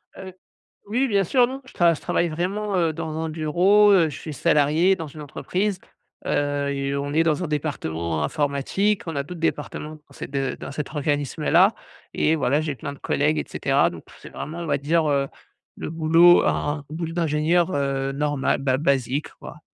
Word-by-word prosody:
Heu. 190 Hz, -1 st, -9 dB, 0.5 s
Oui, 250 Hz, +6 st, +1 dB
bien 200 Hz, -3 st, +2 dB
sûr, 245 Hz, +7 st, +3 dB
non 265 Hz, +1 st, -7 dB
je -, -, -15 dB
je 170 Hz, -3 st, +2 dB
travaille 170 Hz, -, 0 dB
vraiment, 195 Hz, +5 st, -2 dB
heu, 165 Hz, -2 st, +1 dB
dans 160 Hz, -1 st, -5 dB
un 160 Hz, -, -3 dB
bureau. 180 Hz, +7 st, +4 dB
Heu, 170 Hz, -5 st, +4 dB
je -, -, -8 dB
suis 155 Hz, -, -7 dB
salarié 155 Hz, +7 st, +3 dB
dans 165 Hz, -4 st, -6 dB
une 150 Hz, +2 st, -11 dB
entreprise, 185 Hz, +6 st, -2 dB, 0.5 s
heu, 145 Hz, -1 st, 0 dB
et 140 Hz, 0 st, -2 dB
on 145 Hz, +1 st, -3 dB
est 165 Hz, +1 st, +3 dB
dans 165 Hz, +2 st, +1 dB
un -, -, -2 dB
département 85 Hz, -, -2 dB
informatique. 145 Hz, -, 0 dB
On 165 Hz, -3 st, -5 dB
a 140 Hz, -, -1 dB
d'autres 175 Hz, +3 st, -9 dB
départements 150 Hz, -1 st, -3 dB
dans 150 Hz, -, -22 dB
cet -, -, -8 dB
de 135 Hz, -2 st, -2 dB
dans -, -, -7 dB
cet 145 Hz, 0 st, -5 dB
organisme-là, 145 Hz, -1 st, +2 dB, 0.4 s
et 160 Hz, +1 st, +2 dB
voilà, 145 Hz, 0 st, +1 dB
j'ai 150 Hz, -3 st, -3 dB
plein 140 Hz, +2 st, -6 dB
de 140 Hz, -, -15 dB
collègues 150 Hz, +2 st, 0 dB
et -, -, -2 dB
cetera, -, -, +1 dB
donc -, -, -10 dB, 0.2 s
c'est -, -, -11 dB
vraiment, 160 Hz, +3 st, -7 dB
on 170 Hz, -, -4 dB
va 145 Hz, -2 st, +1 dB
dire, 155 Hz, +3 st, +1 dB
heu, 140 Hz, -1 st, +1 dB, 0.5 s
le -, -, -5 dB
boulot 165 Hz, +2 st, +5 dB
un 145 Hz, +1 st, 0 dB
un 140 Hz, -, -14 dB
boulot 165 Hz, +1 st, -4 dB
d'ingénieur, 170 Hz, +2 st, +1 dB
heu, 135 Hz, -1 st, -1 dB
normal, 145 Hz, -1 st, 0 dB
bah, 130 Hz, -1 st, +1 dB
basique, 140 Hz, -1 st, 0 dB
quoi. -, -, -10 dB
155 Hz, 195 wpm, -23 LUFS, 140-175 Hz, 0.5 s, boulot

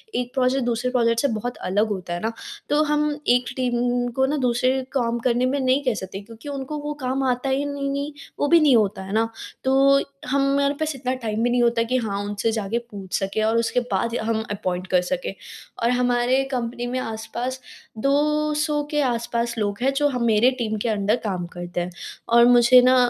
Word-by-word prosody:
एक 250 Hz, 0 st, -2 dB
प्रोजेक्ट 260 Hz, -1 st, +1 dB
दूसरे 240 Hz, +1 st, -1 dB
प्रोजेक्ट 230 Hz, -2 st, +2 dB
से -, -, +2 dB
बहुत 245 Hz, +3 st, -4 dB
अलग 205 Hz, +4 st, +2 dB
होता 185 Hz, -4 st, -4 dB
है 175 Hz, -, -3 dB
ना। 225 Hz, -, -1 dB, 0.4 s
तो 295 Hz, +1 st, +3 dB
हम 300 Hz, 0 st, 0 dB
एक 245 Hz, 0 st, +4 dB
टीम 245 Hz, -1 st, 0 dB
को 265 Hz, -, +3 dB
ना 290 Hz, +3 st, -1 dB
दूसरे 255 Hz, +2 st, +2 dB
काम 240 Hz, -3 st, 0 dB
करने 245 Hz, +1 st, +1 dB
में 270 Hz, +2 st, 0 dB
नहीं 260 Hz, +2 st, +2 dB
कह 255 Hz, -3 st, +1 dB
सकते 190 Hz, +1 st, -7 dB
क्योंकि 230 Hz, +6 st, -11 dB
उनको 280 Hz, +1 st, -4 dB
वो 295 Hz, 0 st, -4 dB
काम 260 Hz, +2 st, 0 dB
आता 255 Hz, +1 st, 0 dB
ही 270 Hz, +2 st, 0 dB
नहीं 280 Hz, 0 st, -2 dB
है, 295 Hz, -, -7 dB, 0.3 s
वो 290 Hz, -, +2 dB
भी 335 Hz, +3 st, +6 dB
नहीं 295 Hz, -5 st, +5 dB
होता 200 Hz, -4 st, +1 dB
है 190 Hz, +1 st, -7 dB
ना। 225 Hz, +1 st, +2 dB, 0.4 s
तो 275 Hz, +1 st, +4 dB, 0.3 s
हमारे 280 Hz, +1 st, +2 dB
पास 310 Hz, -2 st, -1 dB
इतना 255 Hz, -1 st, -2 dB
टाइम 220 Hz, 0 st, -1 dB
भी 245 Hz, -, +2 dB
नहीं 245 Hz, 0 st, +2 dB
होता 235 Hz, -1 st, +2 dB
कि 250 Hz, +2 st, 0 dB
हाँ 205 Hz, -5 st, -2 dB
उनसे 205 Hz, +2 st, -1 dB
जाके 220 Hz, 0 st, -2 dB
पूछ 195 Hz, -3 st, -4 dB
सके 195 Hz, +2 st, -2 dB
और 220 Hz, +1 st, +2 dB
उसके 230 Hz, +2 st, +1 dB
बाद 200 Hz, +4 st, 0 dB
ही -, -, 0 dB
हम 220 Hz, 0 st, -1 dB
अपॉइंट 185 Hz, -3 st, -3 dB
कर 180 Hz, -1 st, +3 dB
सकें 265 Hz, +9 st, -3 dB, 0.5 s
और 235 Hz, -, +3 dB
हमारे 245 Hz, +1 st, +2 dB
कंपनी 240 Hz, -1 st, -3 dB
में 255 Hz, +1 st, -2 dB
आस-पास 240 Hz, +3 st, -4 dB, 0.4 s
200 300 Hz, +1 st, +1 dB
के 295 Hz, -1 st, +1 dB
आस-पास 235 Hz, -2 st, -1 dB
लोग 205 Hz, -2 st, -1 dB
हैं 265 Hz, +2 st, +3 dB
जो 290 Hz, +1 st, +2 dB
ह 255 Hz, -3 st, -2 dB
मेरे 220 Hz, +4 st, +5 dB
टीम 220 Hz, -2 st, -1 dB
के 235 Hz, -, 0 dB
अंडर 210 Hz, 0 st, +1 dB
काम 185 Hz, -5 st, -2 dB
करते 175 Hz, 0 st, -4 dB
हैं। 175 Hz, +1 st, -4 dB, 0.4 s
और 235 Hz, 0 st, +6 dB
मुझे 245 Hz, +1 st, +7 dB
ना 255 Hz, +1 st, +5 dB
245 Hz, 210 wpm, -23 LUFS, 220-270 Hz, 0.5 s, मुझे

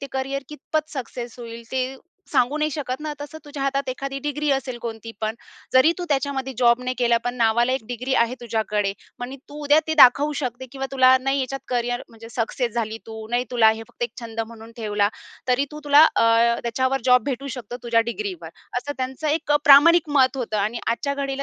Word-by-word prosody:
ते 275 Hz, -, -5 dB
करियर 270 Hz, +1 st, -2 dB
कितपत 305 Hz, +1 st, -3 dB
सक्सेस 245 Hz, -3 st, -6 dB
होईल 235 Hz, -1 st, -8 dB
ते 260 Hz, 0 st, -2 dB, 0.4 s
सांगू 265 Hz, +1 st, +2 dB
नाही 305 Hz, 0 st, +1 dB
शकत 270 Hz, -3 st, -4 dB
ना. 305 Hz, 0 st, -4 dB
तसं 290 Hz, +2 st, -7 dB
तुझ्या 290 Hz, -2 st, -6 dB
हातात 275 Hz, 0 st, -1 dB
एखादी 275 Hz, +2 st, -4 dB
डिग्री 295 Hz, +1 st, -1 dB
असेल 255 Hz, -2 st, -2 dB
कोणती 225 Hz, -1 st, -6 dB
पण. 220 Hz, 0 st, -1 dB, 0.4 s
जरी 260 Hz, +6 st, +6 dB
तू 355 Hz, -, -3 dB
त्याच्यामध्ये 270 Hz, -2 st, -1 dB
जॉब 240 Hz, 0 st, +4 dB
नाही 255 Hz, 0 st, -2 dB
केला, 240 Hz, -1 st, +3 dB
पण 245 Hz, 0 st, -2 dB
नावाला 235 Hz, +1 st, +2 dB
एक 260 Hz, -4 st, -2 dB
डिग्री 250 Hz, +2 st, -2 dB
आहे 235 Hz, +2 st, -5 dB
तुझ्याकडे. 215 Hz, -3 st, -1 dB, 0.3 s
म्हणजे 245 Hz, +2 st, -6 dB
तू 295 Hz, +1 st, -8 dB
उद्या 290 Hz, +2 st, +5 dB
ते 315 Hz, -, 0 dB
दाखवू 285 Hz, +4 st, +6 dB
शकते 255 Hz, 0 st, -4 dB
किंवा 270 Hz, -1 st, -4 dB
तुला 260 Hz, -1 st, +6 dB
नाही 270 Hz, +1 st, 0 dB
याच्यात 270 Hz, +1 st, -3 dB
करियर 245 Hz, 0 st, -1 dB
म्हणजे 225 Hz, 0 st, -13 dB
सक्सेस 235 Hz, +1 st, -2 dB
झाली 225 Hz, -1 st, -2 dB
तू, 220 Hz, -1 st, -8 dB
नाही 245 Hz, +1 st, +1 dB
तुला 230 Hz, -3 st, +5 dB
हे 220 Hz, +1 st, -4 dB
फक्त -, -, -10 dB
एक 480 Hz, -, -1 dB
छंद 225 Hz, -1 st, -5 dB
म्हणून 225 Hz, 0 st, -12 dB
ठेवला. 205 Hz, -3 st, +1 dB, 0.4 s
तरी 250 Hz, +2 st, +3 dB
तू 300 Hz, 0 st, -8 dB
तुला 290 Hz, +1 st, +7 dB
अ, -, -, +4 dB, 0.4 s
त्याच्यावर 260 Hz, +3 st, 0 dB
जॉब 250 Hz, -1 st, +5 dB
भेटू 275 Hz, -1 st, -3 dB
शकतो, 240 Hz, 0 st, -7 dB
तुझ्या 235 Hz, -1 st, +3 dB
डिग्रीवर. 190 Hz, -6 st, -5 dB, 0.3 s
असं 290 Hz, +3 st, -5 dB
त्यांचं 260 Hz, +4 st, -3 dB
एक 305 Hz, 0 st, 0 dB
अ, 295 Hz, -, +6 dB
प्रामाणिक 305 Hz, +3 st, +7 dB
मत 260 Hz, 0 st, +4 dB
होतं 230 Hz, -4 st, -2 dB
आणि 215 Hz, +4 st, -1 dB
आजच्या 280 Hz, +5 st, -1 dB
घडीला 275 Hz, -1 st, -3 dB
255 Hz, 205 wpm, -23 LUFS, 235-280 Hz, 0.4 s, तुला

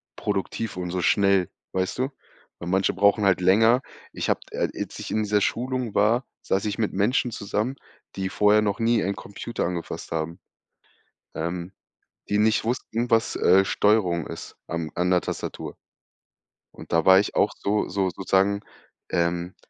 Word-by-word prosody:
produktiv 115 Hz, -4 st, -3 dB
und 90 Hz, -1 st, -3 dB
so 90 Hz, 0 st, -1 dB
schnell, 100 Hz, +1 st, +3 dB, 0.2 s
weißt 95 Hz, 0 st, -1 dB
du? -, -, +2 dB, 0.6 s
Weil 85 Hz, -, -5 dB
manche 95 Hz, +1 st, +2 dB
brauchen 100 Hz, +1 st, +3 dB
halt 95 Hz, -2 st, +3 dB
länger. 110 Hz, +7 st, +5 dB, 0.3 s
Ich -, -, -3 dB
habe -, -, +2 dB
äh, -, -, -1 dB
als -, -, -5 dB
ich -, -, -6 dB
in 110 Hz, -, +1 dB
dieser 105 Hz, 0 st, +1 dB
Schulung 125 Hz, 0 st, -1 dB
war, 115 Hz, +5 st, +3 dB, 0.2 s
saß 95 Hz, +2 st, 0 dB
ich 105 Hz, -2 st, -2 dB
mit 110 Hz, -, 0 dB
Menschen 120 Hz, +5 st, +1 dB
zusammen, 105 Hz, +5 st, -2 dB, 0.4 s
die 95 Hz, -1 st, -2 dB
vorher 105 Hz, +2 st, +4 dB
noch 100 Hz, 0 st, -1 dB
nie 115 Hz, -1 st, +2 dB
einen 100 Hz, +1 st, -1 dB
Computer 110 Hz, +3 st, -5 dB
angefasst 85 Hz, -1 st, -5 dB
haben, 80 Hz, +2 st, -3 dB, 1.0 s
ähm, 85 Hz, +2 st, -4 dB, 0.6 s
die 105 Hz, -, +1 dB
nicht 110 Hz, +1 st, +3 dB
wussten, 120 Hz, 0 st, -2 dB
was, 115 Hz, 0 st, +2 dB
äh, 95 Hz, +2 st, +5 dB
Steuerung 95 Hz, -5 st, +2 dB
ist -, -, -8 dB
am 85 Hz, -2 st, -3 dB
an 90 Hz, +1 st, 0 dB
der 90 Hz, -1 st, +4 dB
Tastatur -, -, -5 dB, 1.0 s
und -, -, -13 dB
da 80 Hz, -1 st, +3 dB
war 95 Hz, 0 st, +8 dB
ich 100 Hz, -, -2 dB
auch -, -, +3 dB
so 105 Hz, +1 st, 0 dB
so 95 Hz, 0 st, 0 dB
sozusagen 95 Hz, +2 st, +1 dB, 0.5 s
ähm, 85 Hz, +1 st, -1 dB
100 Hz, 165 wpm, -25 LUFS, 90-110 Hz, 1.0 s, war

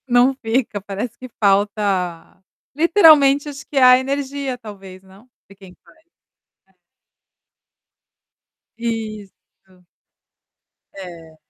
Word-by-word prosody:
Não 245 Hz, +2 st, +3 dB
fica, 225 Hz, -4 st, -3 dB
parece 205 Hz, +4 st, -6 dB
que 255 Hz, -, -11 dB
falta, 195 Hz, -4 st, -1 dB, 0.3 s
literalmente, 305 Hz, -4 st, +5 dB
acho 280 Hz, -1 st, -10 dB
que 290 Hz, -, -7 dB
a 255 Hz, -1 st, +7 dB
energia, 275 Hz, 0 st, -4 dB
talvez, 195 Hz, -5 st, -12 dB
não? 195 Hz, +6 st, -20 dB, 0.2 s
De 195 Hz, -, -16 dB
quem 190 Hz, -2 st, -16 dB
faz, -, -, -23 dB, 0.7 s
é. -, -, -33 dB, 2.1 s
Isso. 215 Hz, -5 st, -8 dB, 1.1 s
É. 170 Hz, -4 st, -12 dB
225 Hz, 95 wpm, -19 LUFS, 195-265 Hz, 2.1 s, a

